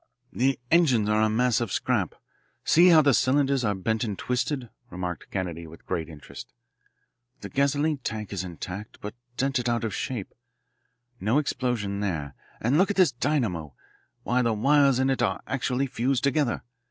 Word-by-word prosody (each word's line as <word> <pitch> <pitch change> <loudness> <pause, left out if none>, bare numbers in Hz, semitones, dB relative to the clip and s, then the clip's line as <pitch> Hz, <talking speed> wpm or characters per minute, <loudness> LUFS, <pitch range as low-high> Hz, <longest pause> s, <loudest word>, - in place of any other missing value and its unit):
"The 135 +2 +1
engines 135 -11 +4
are 105 0 +3
a 110 - +3
mass 125 +2 +2
of 115 -5 -2
scrap; - - 0 0.5
see 175 +3 +6
how 160 -3 +7
the 140 -1 +4
cylinders 135 +1 +2
are 105 -2 +1
bent 110 +5 -1
and 105 -4 -3
twisted," 125 0 -2 0.2
remarked 90 -2 -5
Kennedy 85 -4 -4
with 80 +1 -14
great 85 -3 -3
interest. 75 -3 -11 0.9
"The - - -7
gasoline 145 +1 +1
tank 110 -5 -5
is 95 -2 -2
intact, 90 +3 -7
but 105 +1 -6 0.2
dented 130 -3 0
out 120 -1 0
of 110 - -2
shape. 120 -7 -4 0.9
No 110 +7 +1
explosion 120 -8 -1
there. 80 -9 -3 0.3
And 130 +8 +2
look 190 - +4
at 205 - -2
this 185 -7 +5
dynamo. 115 - -1 0.5
Why, 125 +4 +1
the 115 -2 +1
wires 140 +4 +4
in 130 +1 +2
it 135 - -1
are - - +1
actually 130 0 -1
fused 130 +1 -1
together. 140 -2 +1
120 Hz, 165 wpm, -26 LUFS, 100-135 Hz, 0.9 s, how